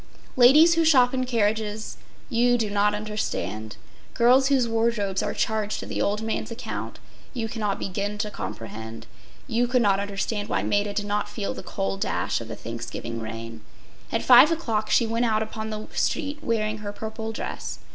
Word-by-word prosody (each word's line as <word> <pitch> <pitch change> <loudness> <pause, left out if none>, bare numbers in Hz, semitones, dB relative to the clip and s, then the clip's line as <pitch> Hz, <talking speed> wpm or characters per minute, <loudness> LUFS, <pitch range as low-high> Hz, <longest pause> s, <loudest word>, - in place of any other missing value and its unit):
Ladies 295 +7 +7
who 330 0 +3
shop 260 -6 +5
in 255 -1 -1
carriages, 215 -2 -1 0.3
you 245 0 +3
do 220 -3 -1
not 205 0 +2
understand. 205 - -4 0.4
Girls 255 +3 +5
whose 265 -4 +3
wardrobes 225 -4 0
are - - -2
charged 215 -1 -1
to - - -6
the - - -3
old 210 +2 0
man’s 220 -1 -2
account, 230 +1 -6 0.4
you 230 -2 -2
cannot 210 -3 -2
begin 200 +2 -3
to 210 0 -2
comprehend—you 115 - -5
could 250 0 +2
not 195 -2 +3
understand 205 +1 -3
why - - 0
Maida 205 0 0
did 205 - -1
not 210 0 -1
feel 210 -1 -3
the - - -7
cold 95 - -3
dash 100 +5 -1
of 115 - -7
the - - -6
Thanksgiving 115 0 -6
rain. 115 0 -7 0.5
At 225 - 0
five 255 +4 +8
o’clock 225 -10 -1
she 235 - +4
went 230 +2 0
out 220 -1 +2
upon 220 0 -6
the 215 0 -5
street 295 -1 -1
wearing 215 -3 -1
her 205 -1 -5
purple 220 +1 -5
dress. 225 - -5
215 Hz, 175 wpm, -25 LUFS, 200-235 Hz, 0.5 s, five